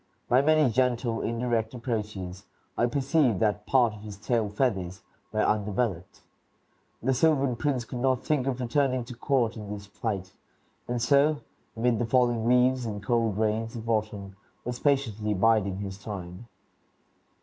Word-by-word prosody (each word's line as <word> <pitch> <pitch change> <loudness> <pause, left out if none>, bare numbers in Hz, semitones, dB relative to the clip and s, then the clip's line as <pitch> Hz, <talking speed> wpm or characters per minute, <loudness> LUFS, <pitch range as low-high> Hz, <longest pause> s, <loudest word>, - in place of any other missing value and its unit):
By 125 +2 +5
many 155 -3 +4
gentle, 120 -1 +1
indirect 115 0 -1
approaches, 105 -6 -4 0.3
I 120 - +2
perceived 135 - +2
that 105 -1 0
part 125 -5 +4
of 105 - -11
his 105 -2 -8
tail 110 0 0
feathers 95 -5 -1 0.3
were 110 0 +1
undeveloped. 105 -3 -1 0.8
The 135 +2 +2
sylvan 140 -2 +2
prince 130 -2 -1
could 125 - -6
not 130 0 +1
think 140 -4 +1
of 130 -2 -1
returning 130 0 +1
to 125 0 -9
court 120 -2 +1
in 105 -3 -8
this 100 -1 -6
plight, 100 -2 -4 0.5
and 120 0 -1
so, 140 +5 +3 0.4
amid 115 -1 +2
the 120 - 0
falling 120 -2 +2
leaves 125 +1 +4
and 105 -2 -5
cold 115 -2 +1
rains 110 +1 0
of 115 -1 -7
autumn, 105 -3 -2 0.3
was 125 0 -4
patiently 110 -7 +1
biding 100 -2 +2
his 100 -1 -6
time. 95 +1 -7
115 Hz, 150 wpm, -27 LUFS, 105-125 Hz, 0.8 s, By